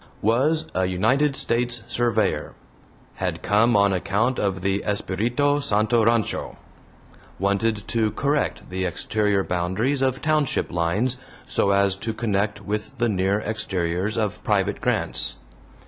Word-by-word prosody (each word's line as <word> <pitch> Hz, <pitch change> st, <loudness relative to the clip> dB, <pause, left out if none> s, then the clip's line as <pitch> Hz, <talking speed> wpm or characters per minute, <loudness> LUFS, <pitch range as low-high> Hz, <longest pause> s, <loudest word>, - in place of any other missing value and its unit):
Was 135 Hz, +9 st, +2 dB
a 95 Hz, 0 st, +1 dB
United 130 Hz, +11 st, +2 dB
States 120 Hz, -1 st, 0 dB
surveyor. 110 Hz, -4 st, 0 dB, 0.6 s
Had -, -, -3 dB
come 110 Hz, +2 st, +3 dB
on 100 Hz, -1 st, +4 dB
account 105 Hz, +7 st, 0 dB
of 95 Hz, -2 st, -1 dB
the 95 Hz, +1 st, 0 dB
Espiritu 120 Hz, +8 st, 0 dB
Santo 110 Hz, -2 st, +2 dB
Rancho. 115 Hz, -1 st, 0 dB, 0.8 s
Wanted 100 Hz, +2 st, 0 dB
to 110 Hz, -2 st, +1 dB
correct 140 Hz, +7 st, -1 dB
the 95 Hz, 0 st, -2 dB
exterior 100 Hz, +2 st, 0 dB
boundaries 95 Hz, +11 st, -1 dB
of 130 Hz, 0 st, +1 dB
township 155 Hz, -3 st, +1 dB
lines, 95 Hz, +9 st, 0 dB, 0.3 s
so 100 Hz, -, +1 dB
as 100 Hz, -1 st, +3 dB
to 110 Hz, +2 st, -4 dB
connect 100 Hz, -2 st, -1 dB
with 105 Hz, +6 st, -4 dB
the 120 Hz, -1 st, +1 dB
near 100 Hz, +1 st, +1 dB
exteriors 95 Hz, -2 st, -2 dB
of 105 Hz, -3 st, -2 dB
private -, -, 0 dB
grants. -, -, 0 dB
105 Hz, 130 wpm, -23 LUFS, 100-120 Hz, 0.8 s, on